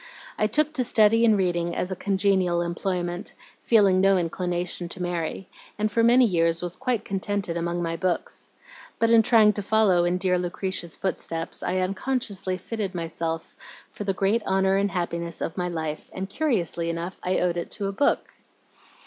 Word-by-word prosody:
I 215 - +1
took 305 +5 +2
to 260 -4 +2
study 225 -1 +5
and 220 -2 +4
reading 175 -2 0
as 180 - -2
a - - -2
congenial 190 -3 +1
employment, 175 0 -3 0.3
feeling 200 -5 +4
no 195 0 +4
inclination 175 0 -3
to 185 - -6
marry, 175 +1 -3 0.3
and 215 +1 0
for 230 - +2
many 245 +2 +6
years 165 -4 +1
was 175 0 -3
quite 245 0 -2
contented 195 -2 -2
among 170 +1 -2
my 165 0 -2
books. 180 0 -3 0.5
But 230 0 +2
in 230 -1 +7
trying 220 -2 +5
to 205 - -3
follow 200 -4 +3
in 175 +1 +1
dear 180 -1 +1
Lucretia's 180 -1 -3
footsteps, 165 -3 -3
I 185 - -1
unconsciously 195 0 -1
fitted 195 0 -4
myself 165 -1 -4 0.4
for - - -6
the 195 -1 0
great 200 +5 +1
honor 190 0 +2
and 200 +1 +1
happiness 170 -2 -3
of 165 - -3
my 180 -1 -2
life, 160 -2 -4
and 190 +1 -4
curiously 195 - -1
enough 170 +3 -4
I 185 +1 0
owed 175 -1 +1
it 170 - -4
to 205 - -3
a - - -2
book." 280 +9 0
185 Hz, 175 wpm, -25 LUFS, 175-205 Hz, 0.5 s, in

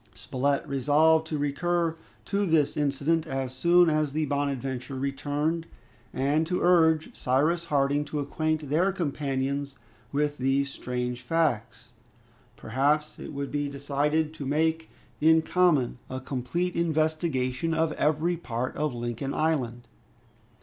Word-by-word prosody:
Spilett 140 +2 -1
resolved 155 +4 +3
to 155 - -2
recur 165 +3 0 0.3
to 200 0 0
this 155 -3 +2
incident 150 +3 0
as 135 -1 -3
soon 175 +6 +5
as 155 -2 +1
the 155 0 0
"Bonadventure" 135 -2 -2
returned, 145 +4 -2 0.4
and 145 +4 +1
to 180 +1 0
urge 160 -3 +3
Cyrus 155 +7 +1
Harding 145 -1 +1
to 150 - -4
acquaint 155 0 -2
their 180 +6 +3
companions 140 -5 -2 0.3
with 145 +1 -1
these 135 +1 +1
strange 125 -1 -4
facts. 125 -7 -1 0.7
Perhaps 145 +6 0
it - - -7
would 140 -1 -4
be 145 -1 -1
decided 145 +3 0
to 155 - -7
make 160 +3 0 0.3
in 160 +1 +5
common 160 -11 +2
a 130 - -4
complete 135 +8 -2
investigation 155 -3 0
of 160 -1 +1
every 155 +4 +1
part 125 -5 -4
of 150 -4 -1
Lincoln 120 +3 -3
Island. 125 -7 -1
145 Hz, 130 wpm, -27 LUFS, 135-160 Hz, 0.7 s, soon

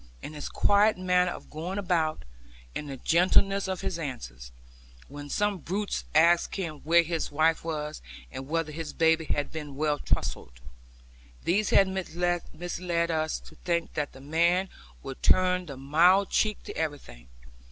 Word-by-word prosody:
And 155 - -7
his 150 - -6
quiet 205 +1 +3
manner 180 -1 +2
of - - -9
going 170 +6 -5
about, 170 - 0 0.5
and 150 - -5
the 135 - -6
gentleness 190 +6 +3
of 190 -1 -3
his 170 - -3
answers 65 - -7 0.6
(when 145 +1 -9
some 205 +3 0
brutes 195 +6 -3
asked 170 +2 +4
him 170 -6 -4
where 170 +3 +4
his 165 -1 -3
wife 160 +2 +2
was, 155 -2 -4 0.3
and 130 0 -7
whether 165 0 -1
his 155 -1 -6
baby 160 0 +3
had 145 -1 -1
been 150 -3 -7
well 150 0 0
trussed), - - -2 0.8
these 200 +4 +1
had 195 - +5
misled 175 -1 -2
us 155 -1 -1
to - - -15
think 170 -1 -2
that 150 -2 -3
the 135 - -13
man 170 +6 +2 0.3
would - - -8
turn 180 - +3
the 140 -3 -7
mild 170 +8 +4
cheek 215 -1 +1
to - - -8
everything. 140 - -5
165 Hz, 155 wpm, -28 LUFS, 150-180 Hz, 0.8 s, had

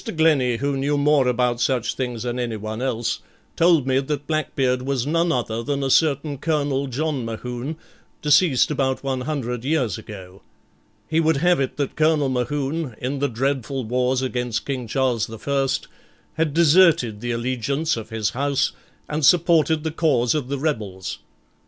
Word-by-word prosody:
Glennie, 140 -7 +3
who 140 +3 -1
knew 145 +2 0
more 145 -2 +3
about 125 -1 +1
such 125 -1 +1
things 125 -3 -4
than 120 0 -3
anyone 110 -1 -4
else, 120 -3 -1 0.4
told 165 -5 +4
me 130 0 +2
that 145 +1 -3
Blackbeard 135 -5 0
was 135 -1 -1
none 165 +3 +1
other 115 -5 -1
than 140 +3 -2
a 135 - 0
certain 145 -2 +2
Colonel 145 -3 0
John 140 +1 -2
Mohune, 120 +5 -5 0.5
deceased 150 -2 +4
about 135 -2 -1
one 135 -2 -2
hundred 125 -4 -3
years 130 - 0
ago. 95 -2 -11 0.7
He 160 +1 +1
would 160 -2 +2
have 175 +2 +3
it 135 -2 -2
that 140 -2 -2
Colonel 155 -3 +2
Mohune, 135 +2 -2
in 135 +3 -3
the 140 0 +1
dreadful 135 +2 -2
wars 125 +3 0
against 125 -3 -2
King 130 -4 -3
Charles 125 -2 0
the 115 - -8
First, 135 +2 -1 0.5
had 160 -1 0
deserted 155 - +4
the 120 - -4
allegiance 130 +6 -1
of 110 -1 -7
his 110 -3 -1
house 140 +1 0 0.4
and 150 +1 -3
supported 160 -1 +4
the 160 - -2
cause 145 -7 +2
of 150 -5 -2
the 140 +1 -2
rebels. 105 -11 -3
135 Hz, 165 wpm, -22 LUFS, 120-150 Hz, 0.7 s, told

